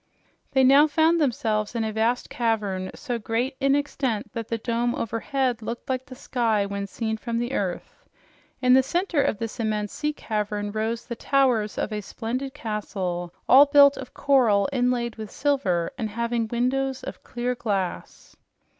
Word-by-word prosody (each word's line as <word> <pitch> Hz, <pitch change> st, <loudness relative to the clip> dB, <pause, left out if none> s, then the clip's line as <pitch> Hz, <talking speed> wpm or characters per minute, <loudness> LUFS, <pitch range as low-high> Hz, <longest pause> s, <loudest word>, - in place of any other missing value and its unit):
They 265 Hz, -, +4 dB
now 275 Hz, +4 st, +7 dB
found 320 Hz, +2 st, +3 dB
themselves 220 Hz, -5 st, 0 dB
in 230 Hz, -, 0 dB
a 220 Hz, -1 st, -2 dB
vast 225 Hz, +3 st, 0 dB
cavern, 210 Hz, -5 st, -1 dB
so 240 Hz, -1 st, -4 dB
great 235 Hz, +5 st, -1 dB
in 275 Hz, 0 st, +3 dB
extent 260 Hz, -7 st, -2 dB
that 230 Hz, -1 st, -4 dB
the 230 Hz, -, -2 dB
dome 235 Hz, +2 st, -1 dB
overhead 245 Hz, +2 st, -1 dB
looked 235 Hz, +3 st, -6 dB
like 260 Hz, +1 st, -2 dB
the 255 Hz, -, -10 dB
sky 230 Hz, -6 st, 0 dB
when 200 Hz, 0 st, -4 dB
seen 220 Hz, +2 st, -3 dB
from 230 Hz, +1 st, -3 dB
earth. 190 Hz, -8 st, -4 dB, 0.5 s
In 250 Hz, 0 st, +6 dB
the 265 Hz, -, +7 dB
center 340 Hz, +3 st, 0 dB
of 215 Hz, -, 0 dB
this 225 Hz, +3 st, -5 dB
immense 215 Hz, -2 st, -1 dB
sea 300 Hz, 0 st, -1 dB
cavern 210 Hz, -6 st, -3 dB
rose 220 Hz, +2 st, -2 dB
the 235 Hz, -, -5 dB
towers 250 Hz, -6 st, +1 dB
of 215 Hz, -, -2 dB
a 210 Hz, -, -2 dB
splendid 250 Hz, +7 st, -4 dB
castle, 190 Hz, -7 st, -3 dB, 0.2 s
all 280 Hz, +3 st, +8 dB
built 285 Hz, 0 st, +7 dB
of 260 Hz, -, -9 dB
coral 240 Hz, -8 st, +3 dB
inlaid 245 Hz, -2 st, 0 dB
with 215 Hz, -1 st, -6 dB
silver 195 Hz, -, 0 dB
and 220 Hz, -2 st, -2 dB
having 235 Hz, +1 st, -1 dB
windows 260 Hz, +3 st, -1 dB
of -, -, -7 dB
clear 245 Hz, +1 st, -2 dB
glass. 195 Hz, -, -4 dB
235 Hz, 165 wpm, -25 LUFS, 215-265 Hz, 0.5 s, all